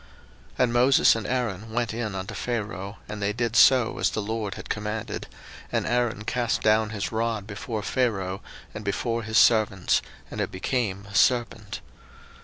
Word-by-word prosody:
02:007:010 - - -23
And 120 -2 +1
Moses 125 +1 +5
and 115 -2 -4
Aaron 115 -4 -2
went 120 -2 -1
in 110 -3 -3
unto 95 0 -5
Pharaoh, 105 -4 -4
and 105 0 -6
they 100 +1 0
did 115 0 -2
so 125 -2 +5
as - - +3
the - - -3
LORD 110 -1 -3
had - - -9
commanded: 105 0 -4 0.4
and - - 0
Aaron 120 -3 0
cast 120 +1 -1
down 110 0 +3
his 105 -2 -3
rod 110 -2 -1
before 105 +1 -5
Pharaoh, 100 -8 -1 0.3
and 110 - -7
before 115 +3 -1
his 110 0 -1
servants, 110 -5 +4 0.3
and - - -3
it - - -2
became 100 -1 -2
a - - -12
serpent. 115 -1 +1
110 Hz, 170 wpm, -26 LUFS, 100-120 Hz, 0.4 s, Moses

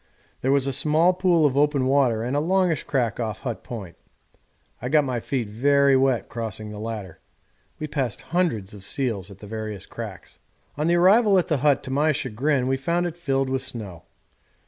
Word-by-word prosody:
There 130 - +1
was 140 -1 +3
a 135 - -1
small 155 +6 +3
pool 175 -3 +3
of 135 -3 +2
open 145 -2 +2
water 130 -5 +2
and 125 +4 -2
a - - +3
longish 175 -1 +1
crack 120 -6 -1
off 110 -3 -3
Hut 120 -4 -5
Point. 100 -8 -8 0.9
I 125 - -3
got 150 +1 +4
my 130 -3 -2
feet 120 -1 -2
very 140 +5 +3
wet 130 -2 +2
crossing 110 -2 -5
the 105 - -8
latter. 105 -6 -6 0.6
We 155 - -4
passed 135 -8 -3
hundreds 115 - 0
of 100 -2 -11
seals 105 -4 -2
at 100 - -12
the 105 - -12
various 110 -2 -5
cracks. - - -9 0.4
On 150 +2 -1
the 170 - +3
arrival 195 +3 +5
at 180 - +1
the 155 - +2
hut 140 0 +2
to 130 - -6
my 150 +3 +2
chagrin 130 +2 0
we 135 +1 +1
found 170 +6 0
it 170 -2 -3
filled 135 -6 0
with 130 0 -1
snow. 100 -10 -7
135 Hz, 195 wpm, -24 LUFS, 110-150 Hz, 0.9 s, arrival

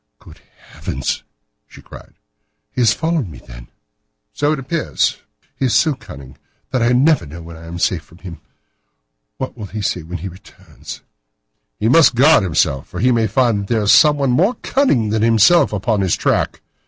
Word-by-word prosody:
"Good - - -17 0.3
heavens!" 65 0 -4 0.5
she - - -15
cried, - - -14 0.6
"he 125 - -3
has 115 -3 +4
followed 160 - -1
me, 75 - -11
then." - - -13 0.7
"So 145 +1 0
it 155 - 0
appears." 135 +5 -1 0.4
"He 135 - -2
is 125 - +1
so 155 -2 +3
cunning 70 - -13 0.3
that 130 - 0
I 120 +1 +2
never 140 - +3
know 80 +4 -10
when 85 0 -11
I 80 0 -12
am 85 +1 -7
safe 85 -1 0
from 85 - -20
him. 90 -2 -10 1.0
What 130 - -5
will 110 -4 -8
he 105 +1 -6
say 90 - -1
when 85 +3 -7
he 90 +4 -6
returns?" 95 +2 -12 0.8
"He 110 - 0
must 145 0 +5
guard 145 +4 +5
himself, 75 -7 0
for - - -8
he 125 +2 +3
may 115 -2 +1
find 115 0 +1
that 100 - -6
there 110 -2 +1
is 105 - +3
someone 145 -3 +4
more 190 - +2
cunning 135 - +1
than 110 0 0
himself 115 - +4
upon 105 0 -1
his 95 -3 +1
track. - - -1
110 Hz, 185 wpm, -18 LUFS, 90-135 Hz, 1.0 s, must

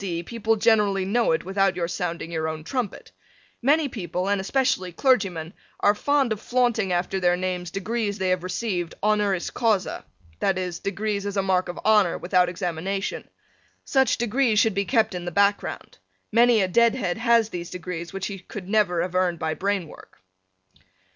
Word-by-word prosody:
D. 170 -3 -3
people 225 +2 0
generally 205 -3 +2
know 230 +2 +2
it 160 - 0
without 195 0 +1
your 175 -1 -1
sounding 170 -1 -4
your 160 -1 -2
own 155 0 -5
trumpet. 245 - -4 0.5
Many 290 +4 +3
people, 180 - -3
and 200 -1 +1
especially 190 -4 0
clergymen, 185 - +1 0.3
are 205 - +4
fond 275 +1 +1
of 210 - -9
flaunting 240 -6 +1
after 180 +2 0
their 175 -1 +2
names 180 -1 -3
degrees 205 +2 -2
they 190 -2 -1
have 185 -1 +1
received 185 -2 -3
honoris 205 -3 +1
causa, 215 -5 0 0.4
that 195 -2 +1
is, 180 -2 -3
degrees 200 +1 -2
as 200 0 -4
a 195 - +2
mark 185 -1 +1
of 175 - -6
honor, 210 -5 +4
without 180 0 +2
examination. 180 +2 -3 0.6
Such 265 -2 +2
degrees 240 0 +1
should 220 +1 +4
be 200 +1 0
kept 220 -2 +2
in 175 -1 -5
the - - -2
background. 200 +3 0 0.3
Many 235 0 +5
a - - +1
deadhead 225 -2 +2
has 230 -2 +3
these 175 -3 -6
degrees 175 -1 -6
which 195 -1 -4
he 195 -2 -5
could 185 0 -9
never 195 -5 +2
have 180 - -5
earned 185 -2 +1
by 160 0 -2
brain 195 0 -1
work. - - -15
195 Hz, 175 wpm, -24 LUFS, 180-220 Hz, 0.6 s, Many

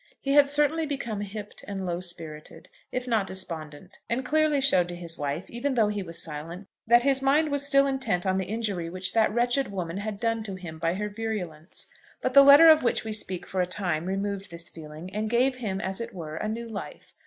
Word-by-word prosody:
He 275 - -2
had 290 -1 +7
certainly 295 +2 +2
become 235 -8 -3
hipped 205 +1 -7
and 195 -2 -4
low 175 -1 -2
spirited, 165 -4 -8 0.2
if 255 0 -3
not 220 -5 +1
despondent, 175 -2 -3
and 250 +2 -1
clearly 310 +1 +2
showed 185 -10 +4
to 175 - -5
his 170 -1 -5
wife, 145 +4 -3
even 255 +3 -2
though 220 -3 +3
he 210 -1 -2
was 170 -2 -2
silent, 165 +5 -7 0.2
that 240 +1 +6
his 270 0 +3
mind 295 +3 +3
was 285 0 0
still 275 0 +5
intent 265 -10 -1
on 190 0 +1
the 190 - -3
injury 205 -6 -2
which 185 +1 -2
that 225 -1 +3
wretched 245 +1 +1
woman 180 -2 -4
had 205 0 -4
done 225 -1 0
him 185 -6 -7
by 165 +2 0
her 210 +2 -2
virulence. 205 -7 -6 0.3
But 255 - -2
the 280 - +10
letter 285 +4 +9
of 315 -1 +8
which 240 - 0
we 220 - -4
speak 190 -4 -3
for 190 - -1
a 180 - 0
time 175 -3 -2
removed 195 0 -3
this 170 0 -6
feeling, 160 +3 -10
and 215 +1 -2
gave 250 +3 +2
him, 205 -6 -3
as 190 +3 -2
it 230 -2 -7
were, 155 -3 -6
a 215 - -3
new 230 +2 -4
life. 220 -3 -8
205 Hz, 220 wpm, -27 LUFS, 180-245 Hz, 0.3 s, the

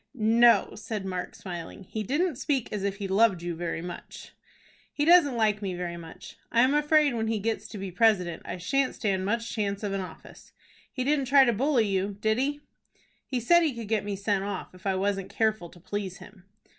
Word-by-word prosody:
"No," 230 +1 +4
said 210 -4 -5
Mark, 185 -1 -4
smiling; 175 0 -8
"he 215 +4 -5
didn't 295 - 0
speak 275 -5 -1
as 205 -2 -3
if 200 -1 -1
he 200 -1 -5
loved 195 -2 +3
you 175 0 -2
very 165 0 -4
much." 175 -1 -9 0.6
"He 295 - -1
doesn't 320 -7 +6
like 215 -2 +2
me 190 -3 -3
very 175 -1 -4
much. 165 -1 -11
I 235 - +4
am 260 +3 +4
afraid 295 -1 +3
when 225 -1 -1
he 225 0 0
gets 220 +2 -2
to 215 - -9
be 195 -1 -5
president 180 -5 +2
I - - -5
shan't 260 +10 0
stand 190 -3 -1
much 230 +3 -1
chance 200 -2 -2
of 200 -1 -2
an 195 - -1
office. 185 - -12 0.4
He 255 - -3
didn't 280 0 +1
try 270 +1 +6
to 240 - +2
bully 250 0 +2
you, 195 0 -1
did 220 +2 +1
he?" 290 +2 -1 0.7
"He 255 - -1
said 345 +9 +5
he 310 -7 0
could 230 -3 -7
get 220 -3 +1
me 205 -1 -3
sent 200 0 -1
off 200 -2 -5
if 185 +2 -8
I 190 - +1
wasn't 195 0 -1
careful 215 -6 0
to 175 - -17
please 195 +1 -5
him." 190 -3 -15
210 Hz, 215 wpm, -27 LUFS, 190-240 Hz, 0.7 s, doesn't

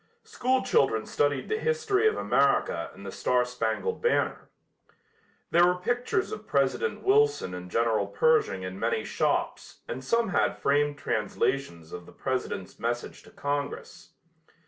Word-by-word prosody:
School 255 +1 0
children 115 -5 +2
studied 145 -1 0
the 440 0 -1
history 445 -3 +1
of 435 - +1
America 135 -11 +1
and 100 - -12
"The 95 - -5
Star 125 +4 +1
Spangled 125 - -2
Banner." 475 - 0 1.0
There 170 - +5
were 180 - +2
pictures 245 - -1
of 430 - -7
President 465 - 0
Wilson 430 - +3
and 90 0 -7
General 110 -1 +1
Pershing 100 -3 +2
in 95 +1 -6
many - - 0
shops - - -2
and 130 +2 -5
some 230 - +1
had - - +1
framed 145 +1 +1
translations 105 - -2
of 90 -1 -8
the - - -14
President's 130 -8 -4
message 120 +1 -3
to - - -17
Congress. 145 0 -5
140 Hz, 145 wpm, -27 LUFS, -, 1.0 s, There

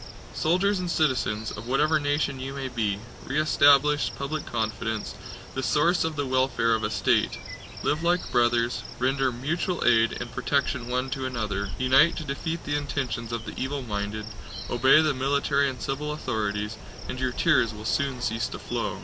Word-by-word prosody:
Soldiers 185 +5 +2
and 180 -1 -3
citizens, 120 -9 0
of 105 +3 -8
whatever 150 +4 +3
nation 145 -2 0
you 135 +1 -5
may 135 -1 -4
be, 110 -5 -1 0.3
re 140 +3 -1
establish 145 -1 +4
public 145 +3 -4
confidence, 110 -1 -2 0.4
the 130 - -2
source 170 +6 +2
of 160 -1 -2
the 145 -1 -1
welfare 130 -3 +2
of 110 -1 0
a - - 0
state, - - +1 0.5
live 150 +2 +1
like 175 +1 +1
brothers, 120 0 +2 0.2
render 130 +1 +1
mutual 160 +8 -2
aid 115 -1 +4
and - - -6
protection 140 -3 0
one 125 +1 -1
to 130 -1 -2
another, 105 -5 -2
unite 135 +6 +5
to 155 - -4
defeat 160 +4 -4
the 145 - -2
intentions 130 -5 -3
of 115 -1 -4
the - - -6
evil 140 +1 -3
minded, 105 -1 -3 0.5
obey 130 +6 +5
the 155 -2 +2
military 140 +1 +1
and 130 - -7
civil 150 +2 -2
authorities, 105 -6 -2 0.3
and 130 - -5
your 130 -1 0
tears 130 -5 +3
will 105 0 -9
soon 135 +1 0
cease 120 0 -1
to - - -7
flow! - - -3
130 Hz, 175 wpm, -26 LUFS, 115-145 Hz, 0.5 s, unite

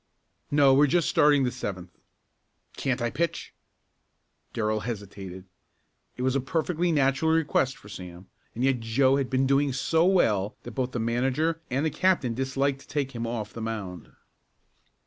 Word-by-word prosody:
"No, 140 -2 +5
we're 145 +2 +5
just 170 +3 +2
starting 145 -2 +4
the 125 - 0
seventh." 95 -7 -6 0.8
"Can't 125 -2 -1
I 120 - 0
pitch?" 170 +6 -2 1.0
Darrell 110 -1 -1
hesitated. 100 -4 -7 0.7
It 125 - -3
was 130 +1 +1
a - - +3
perfectly 165 +5 0
natural 140 +1 +2
request 150 -4 +1
for - - -16
Sam 90 -2 -9 0.3
and 120 - -2
yet 135 -2 +2
Joe 130 +4 +2
had 135 -2 -1
been 130 0 +1
doing 140 +1 +2
so 160 +5 +2
well 105 - +2
that 120 - -7
both 130 +2 -3
the 120 - -2
manager 130 +8 0
and 135 +5 0
the 160 - 0
captain 175 -11 +1
disliked 135 +2 -1
to - - -17
take 140 -2 -2
him 115 -2 -4
off 110 -2 -4
the 115 - -7
mound. 100 -7 -5
130 Hz, 165 wpm, -27 LUFS, 115-145 Hz, 1.0 s, No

